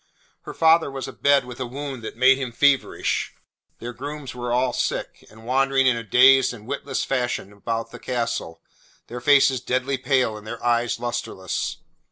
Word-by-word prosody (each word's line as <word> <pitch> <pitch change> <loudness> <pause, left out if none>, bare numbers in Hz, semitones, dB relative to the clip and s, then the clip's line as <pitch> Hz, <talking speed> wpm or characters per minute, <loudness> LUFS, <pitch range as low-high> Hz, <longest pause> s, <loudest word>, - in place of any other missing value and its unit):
Her - - -7
father 160 -1 +4
was 135 -1 -6
abed 140 -2 +2
with 125 0 -10
a 130 - -3
wound 135 0 -6
that 110 - -8
made 130 +2 +5
him 130 -3 -4
feverish. 140 +3 +1 0.4
Their 120 +1 -7
grooms 145 +2 -7
were 120 -1 -4
all 125 0 +1
sick, - - -3
and 110 +1 -16
wandered 135 +1 +2
in 130 -2 +4
a 115 - -5
dazed 130 +3 +5
and 105 -2 -14
witless 140 +1 -3
fashion 125 -6 -2
about 115 +3 -4
the - - -10
castle, 115 -9 -3 0.4
their 120 +1 -8
faces 135 -2 +4
deadly 130 +2 -1
pale 130 -5 +1
and 105 0 -12
their 115 +1 -7
eyes 120 0 +1
lustreless. 120 -6 -4
125 Hz, 175 wpm, -23 LUFS, 120-135 Hz, 0.4 s, made